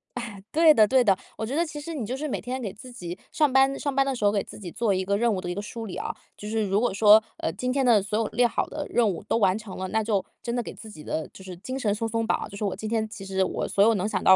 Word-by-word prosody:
哎， 230 -5 -6
对 320 0 +6
的 215 -4 +5
对 260 +1 +4
的， 195 -5 +4 0.2
我 220 - -2
觉 245 - -4
得 335 +4 +2
其 305 -2 -7
实 330 +2 -6
你 260 -7 -3
就 250 - -3
是 290 +3 -4
每 295 - -2
天 255 +1 -4
给 205 -5 -3
自 255 +5 -12
己 180 -7 -7 0.2
上 300 -3 +3
班 270 +1 +4
上 285 -2 -2
班 275 0 +3
的 270 -1 -1
时 225 - -5
候， 205 - +5
给 205 - +1
自 - - -10
己 180 -5 -8
做 225 -4 +1
一 185 - 0
个 200 +2 +1
任 235 0 +2
务 185 - -2
的 175 - -5
一 - - -1
个 205 - -4
梳 225 +2 -6
理 190 - -6
啊， - - -3 0.3
就 210 - -8
是 220 0 0
如 200 0 +1
果 240 -3 +1
说， 210 +2 +7 0.2
呃， - - -1
今 250 +9 -2
天 270 -1 +1
的 225 -4 +5
所 200 +2 -2
有 225 - +1
列 245 +2 +3
好 - - -1
的 - - -5
任 235 -2 +3
务 180 - -3
都 - - -1
完 195 -2 +3
成 215 -3 -8
了， 185 0 -4
那 220 +2 +1
就 210 -3 0 0.2
真 235 0 -3
的 245 - 0
给 - - -7
自 220 - -11
己 155 -8 -11
的 160 - -3
就 190 - -12
是 185 -1 -8
精 255 +8 -5
神 215 -6 +1
松 225 +2 -2
松 225 0 -1
绑， - - 0
就 200 - -10
是 205 - -5
我 200 - 0
今 215 +3 -5
天 220 -1 0
其 205 -3 -9
实 190 0 0
我 - - -2
所 200 - +3
有 225 +1 +5
能 195 +2 0
想 190 -4 -2
到 - - +6
220 Hz, 365 characters per minute, -26 LUFS, 195-245 Hz, 0.3 s, 说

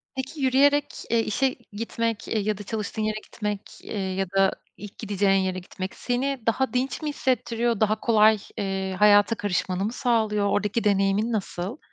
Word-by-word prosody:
Peki 265 +3 -5
yürüyerek, 280 +2 +4 0.2
eee, 230 - +3
işe 260 +5 0 0.2
gitmek, 230 +1 -2
eee, 220 - 0
ya 210 0 -1
da 205 - -7
çalıştığın 215 +1 -4
yere 215 0 -1
gitmek, 210 -2 -4 0.2
eee, - - -10 0.2
ya 195 0 0
da 195 0 +4 0.3
ilk 205 -1 -10
gideceğin 200 -2 +2
yere 185 0 -2
gitmek 185 +1 -7
seni 260 +2 -1
daha 260 +4 +1
dinç 255 +5 -1
mi 305 - -2
hissettiriyor, 240 -4 0
daha 215 0 +2
kolay, 220 -1 +5 0.2
eee, 190 -1 -2
hayata 205 +1 +6
karışmanı 190 -2 -1
mı 220 - -2
sağlıyor, 220 -5 +1
oradaki 210 +3 0
deneyimin 200 +2 +2
nasıl? 195 0 -3
215 Hz, 165 wpm, -25 LUFS, 200-240 Hz, 0.3 s, hayata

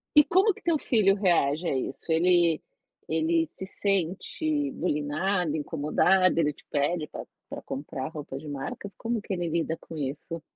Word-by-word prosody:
e 300 - +10
como 385 +4 +4
que - - -15
teu 330 -3 +2
filho 205 -7 +3
reage 175 -5 +2
a 135 - +1
isso? 135 +5 -4
Ele 170 -1 +4 0.5
ele 160 0 +1
se 190 - -5 0.2
sente 205 - 0
bulinado, 160 - 0
incomodado, 165 +5 +2
ele 150 -2 +2
te - - -20
pede 150 +2 0
pa - - -8 0.2
pra - - -6
comprar 135 -1 -5
roupa 145 -4 -7
de 150 +1 -10
marcas, 145 +7 -6
como 230 -1 -2
que 200 - -6
ele 175 -2 -2
lida 165 0 -1
com 160 - -11
isso? 150 +4 -4
165 Hz, 165 wpm, -27 LUFS, 150-195 Hz, 0.5 s, e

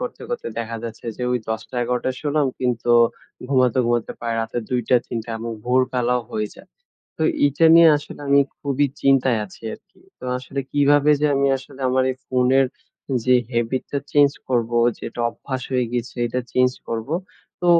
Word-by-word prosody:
করতে, - - -5
করতে 480 - -3
দেখা 115 0 -4
যাচ্ছে 115 -2 -8
যে, - - -6
ওই 125 - +2
১০টা, 110 +3 -4
১১টা 125 +2 -1
শুলাম, 150 -1 +1
কিন্তু 120 -2 0 0.6
ঘুমাতে, 130 -3 +3
ঘুমাতে 120 -1 0
পারায় 115 -1 -2
রাতের 115 +1 -3
২টা, 125 -1 +1
৩টা 115 -1 -5
এবং 115 +1 -4
ভোরবেলাও 125 -1 +1
হয়ে 105 -2 -2
যায়। - - -16 0.5
তো - - -3 0.2
এইটা 145 +3 +1
নিয়ে 165 0 +8
আসলে 145 - -11
আমি 140 0 +6 0.2
খুবই 140 0 +1 0.2
চিন্তায় 135 -3 +3
আছি 95 - -17
আরকি। - - -21 0.2
তো - - -11
আসলে 135 +2 -5
কিভাবে 145 +1 +4
যে 150 - +3
আমি 140 0 +3
আসলে 130 +1 -14
আমার 130 0 +2
এই - - -13
ফোনের 130 +1 +3 0.6
যে 125 - +4 0.2
হ্যাভিট 120 +2 0
টা 140 - +1
চেঞ্জ 145 -1 +5 0.2
করব, 120 -3 +1 0.3
যে - - -9 0.2
অভ্যাস 130 +2 -6
হয়ে 125 -1 +2
গেছে 120 0 -3
এটা 125 +2 -2
চেঞ্জ 125 0 +4 0.2
করবো? 115 +6 -3 0.5
তো, 180 - -1
125 Hz, 170 wpm, -22 LUFS, 120-140 Hz, 0.6 s, নিয়ে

